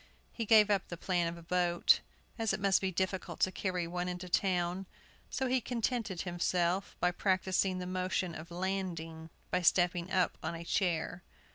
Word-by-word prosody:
He 230 Hz, -, -3 dB
gave 215 Hz, -1 st, +6 dB
up 195 Hz, -3 st, +1 dB
the 175 Hz, -, -6 dB
plan 175 Hz, -1 st, 0 dB
of 170 Hz, +1 st, -4 dB
a 170 Hz, -, -11 dB
boat, 175 Hz, 0 st, +3 dB, 0.4 s
as 225 Hz, -3 st, +1 dB
it 195 Hz, -, -1 dB
must 195 Hz, -1 st, +3 dB
be 190 Hz, -1 st, 0 dB
difficult 185 Hz, -1 st, -2 dB
to 185 Hz, -, +3 dB
carry 180 Hz, -3 st, -2 dB
one 175 Hz, +1 st, -3 dB
into 180 Hz, 0 st, -4 dB
town; 180 Hz, 0 st, 0 dB, 0.4 s
so 265 Hz, -, -1 dB
he 255 Hz, 0 st, +2 dB
contented 230 Hz, -5 st, -2 dB
himself 175 Hz, +1 st, 0 dB
by 180 Hz, -, +3 dB
practising 185 Hz, 0 st, +1 dB
the 180 Hz, -, -4 dB
motion 185 Hz, -1 st, -1 dB
of 160 Hz, +2 st, -8 dB
landing 170 Hz, -3 st, -3 dB, 0.2 s
by -, -, +2 dB
stepping 175 Hz, 0 st, +3 dB
up 185 Hz, -2 st, +1 dB
on -, -, -3 dB
a 165 Hz, -, -6 dB
chair. 175 Hz, -1 st, 0 dB
180 Hz, 175 wpm, -32 LUFS, 175-195 Hz, 0.4 s, gave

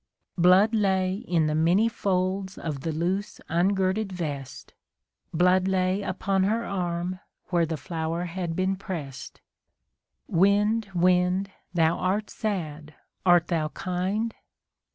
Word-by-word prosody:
Blood 185 Hz, +5 st, +5 dB
lay 190 Hz, -3 st, +2 dB
in 180 Hz, -6 st, 0 dB
the 155 Hz, -, 0 dB
many 170 Hz, +8 st, +3 dB
folds 190 Hz, -3 st, -1 dB
of 150 Hz, -4 st, -4 dB
the 165 Hz, -, -2 dB
loose 180 Hz, +6 st, -2 dB
ungirded 190 Hz, +4 st, +1 dB
vest. 140 Hz, -6 st, -6 dB, 0.6 s
Blood 180 Hz, +2 st, +3 dB
lay 185 Hz, +1 st, +1 dB
upon 195 Hz, 0 st, -1 dB
her 225 Hz, +3 st, 0 dB
arm 180 Hz, -1 st, -2 dB, 0.3 s
where 170 Hz, -2 st, +2 dB
the 160 Hz, 0 st, -3 dB
flower 165 Hz, +3 st, -3 dB
had 170 Hz, -1 st, -4 dB
been 185 Hz, +2 st, +1 dB
prest. 155 Hz, -9 st, -7 dB, 0.9 s
Wind, 205 Hz, +4 st, +2 dB
wind! 180 Hz, +2 st, +2 dB, 0.2 s
thou 165 Hz, -1 st, +3 dB
art 200 Hz, +3 st, -1 dB
sad, 155 Hz, -8 st, -4 dB, 0.3 s
art 175 Hz, -1 st, +5 dB
thou 160 Hz, -3 st, +1 dB
kind? 190 Hz, +7 st, -2 dB
185 Hz, 120 wpm, -26 LUFS, 165-195 Hz, 0.9 s, Blood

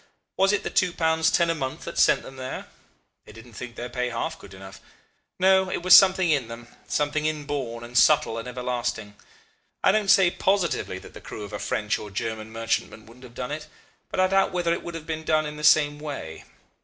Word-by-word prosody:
Was 195 Hz, +1 st, +3 dB
it 205 Hz, -, 0 dB
the -, -, -4 dB
two 180 Hz, -3 st, +1 dB
pounds 160 Hz, -1 st, +2 dB
ten 170 Hz, 0 st, +2 dB
a -, -, +1 dB
month 135 Hz, -5 st, -5 dB
that -, -, -4 dB
sent -, -, +4 dB
them 135 Hz, -, -11 dB
there? 130 Hz, 0 st, -6 dB, 0.6 s
They -, -, -13 dB
didn't 115 Hz, +2 st, -14 dB
think 120 Hz, +2 st, -8 dB
their 120 Hz, -, -5 dB
pay 125 Hz, 0 st, -2 dB
half 160 Hz, +7 st, -4 dB
good 95 Hz, -, -13 dB
enough. 95 Hz, 0 st, -12 dB, 0.6 s
No; 190 Hz, 0 st, +4 dB
it 175 Hz, -, -3 dB
was 185 Hz, 0 st, +8 dB
something 185 Hz, -3 st, +6 dB
in 140 Hz, -6 st, +1 dB
them, 115 Hz, 0 st, -10 dB, 0.2 s
something 150 Hz, +1 st, 0 dB
inborn 140 Hz, -6 st, -4 dB
and 120 Hz, +1 st, -11 dB
subtle 145 Hz, -3 st, +4 dB
and 115 Hz, -, -7 dB
everlasting. 125 Hz, -4 st, -3 dB, 0.7 s
I -, -, +6 dB
don't 210 Hz, -2 st, 0 dB
say 185 Hz, -3 st, +6 dB
positively 185 Hz, -, 0 dB
that -, -, -13 dB
the -, -, -11 dB
crew 105 Hz, -, -8 dB
of 105 Hz, 0 st, -9 dB
a 105 Hz, -, -4 dB
French 105 Hz, -1 st, -1 dB
or 105 Hz, -, -8 dB
German 110 Hz, +2 st, -5 dB
merchantman 115 Hz, -1 st, -3 dB
wouldn't 125 Hz, +3 st, -15 dB
have 120 Hz, -1 st, -15 dB
done 125 Hz, -, -5 dB
it, 150 Hz, 0 st, -5 dB, 0.4 s
but -, -, -4 dB
I 185 Hz, -, +5 dB
doubt 195 Hz, +1 st, +2 dB
whether 175 Hz, -2 st, 0 dB
it -, -, -3 dB
would 170 Hz, -, -7 dB
have 160 Hz, -2 st, -7 dB
been 160 Hz, -1 st, -4 dB
done 155 Hz, -1 st, +1 dB
in 150 Hz, 0 st, -6 dB
the 150 Hz, -, -8 dB
same 150 Hz, -1 st, +4 dB
way. 140 Hz, -, -7 dB
145 Hz, 220 wpm, -25 LUFS, 115-165 Hz, 0.7 s, was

